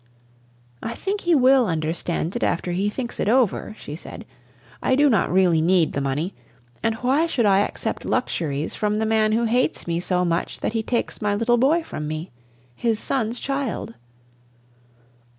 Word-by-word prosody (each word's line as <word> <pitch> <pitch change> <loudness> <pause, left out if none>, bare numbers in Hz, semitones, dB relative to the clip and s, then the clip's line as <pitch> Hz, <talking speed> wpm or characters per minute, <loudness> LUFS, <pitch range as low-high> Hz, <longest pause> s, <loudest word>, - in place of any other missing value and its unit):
"I 230 - -4
think 400 +1 -3
he 345 -1 +3
will 260 -2 +5
understand 165 +2 -2
it 240 - -2
after 175 +1 0
he 195 +4 0
thinks 240 +2 -5
it - - +1
over," 230 -3 +1
she 145 - -7
said. 165 - -10 0.6
"I 260 - +2
do 290 0 +4
not 215 - +2
really 180 -3 +4
need 170 0 +3
the 140 - -1
money, 145 +7 -2 0.5
and 225 0 0
why 265 +8 +1
should 250 -8 +1
I 195 -1 +5
accept 205 - -2
luxuries 150 -2 -1
from 210 0 0
the 220 +1 0
man 220 -1 +2
who 230 +2 +2
hates 245 +3 +1
me 170 0 -1
so 180 0 0
much 170 0 -2
that - - -1
he 225 - 0
takes 235 +2 -2
my 205 -1 +1
little 235 +3 +2
boy 310 +7 +3
from 150 - -6
me 155 +3 -5 0.4
his 225 - 0
son's 240 -2 -1
child?" 275 - -3
215 Hz, 175 wpm, -23 LUFS, 175-245 Hz, 0.6 s, will